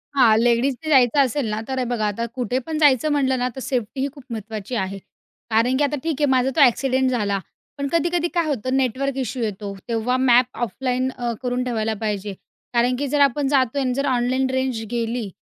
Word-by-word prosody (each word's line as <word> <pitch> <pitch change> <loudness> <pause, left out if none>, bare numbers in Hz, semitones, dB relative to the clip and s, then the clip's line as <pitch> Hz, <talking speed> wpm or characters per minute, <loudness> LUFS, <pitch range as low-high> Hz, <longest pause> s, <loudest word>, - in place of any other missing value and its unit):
हां, 230 -5 +5
लेडीजने 245 +5 +1
जायचं 265 -2 +4
असेल 270 0 +2
ना, 215 - -2
तर 265 -1 -3
हे - - +1
बघा, 220 -3 0
आता 210 +3 -2
कुठे 250 -1 -1
पण 320 -1 -3
जायचं 295 0 +4
म्हटलं 265 -3 +1
ना, 250 - +1
तर - - -6
सेफ्टीही 260 +1 -2
खूप 280 -3 -13
महत्त्वाची 220 +1 -5
आहे. 195 -2 -2 0.5
कारण 230 +4 +2
की 295 - +2
आता 290 +1 0
ठीक 325 -2 -1
आहे - - +5
माझा 260 0 +3
तो 310 - +3
एक्सिडेंट 260 +1 +1
झाला, 205 -5 0 0.4
पण 280 0 -2
कधी-कधी 340 0 +1
काय 340 -2 +1
होतं, 255 -3 -1
नेटवर्क 270 +1 0
इश्यू 255 -1 -2
येतो, 205 -2 -4
तेव्हा 235 +2 0
मॅप 255 -1 +5 0.2
ऑफलाईन 255 +1 -2
अ, 240 -2 -3
करून 250 0 -1
ठेवायला 225 -3 -1
पाहिजे. 205 -2 -2 0.4
कारण 245 +1 +2
की 285 - -1
जर 290 +2 0
आपण 280 0 +3
जातो 270 -1 +2
आणि 255 -2 0
जर 275 +2 -1
ऑनलाईन 260 0 +1
रेंज 260 -3 -1
गेली 230 -2 -2
255 Hz, 200 wpm, -22 LUFS, 230-270 Hz, 0.5 s, हां